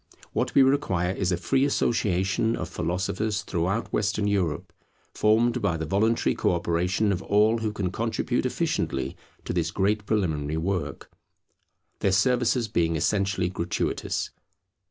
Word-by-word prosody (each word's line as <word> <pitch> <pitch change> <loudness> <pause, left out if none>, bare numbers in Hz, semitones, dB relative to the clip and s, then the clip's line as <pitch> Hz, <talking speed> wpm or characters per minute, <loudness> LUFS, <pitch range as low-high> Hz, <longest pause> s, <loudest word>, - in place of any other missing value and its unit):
What - - -1
we 135 - +7
require 115 -11 +1
is 95 -2 -1
a 90 - +1
free 135 +9 +1
association 110 -5 +1
of 90 - -4
philosophers 95 +5 -2
throughout 95 +5 -2
Western 105 0 0
Europe, 90 -4 -1 0.4
formed 115 +3 +2
by 95 -6 +1
the 80 - -3
voluntary 110 +7 +2
co - - +1
operation 90 +5 0
of 95 -2 -1
all 105 +3 +3
who 110 -1 -1
can 100 -4 -2
contribute 115 +3 -1
efficiently - - -2 0.3
to - - -2
this 85 -2 0
great 100 +3 0
preliminary 80 -8 0
work; 80 -4 -3 0.9
their 100 - +2
services 120 +4 +2
being 85 -6 +1
essentially 95 +1 +1
gratuitous. 90 -1 -2
95 Hz, 135 wpm, -26 LUFS, 90-110 Hz, 0.9 s, we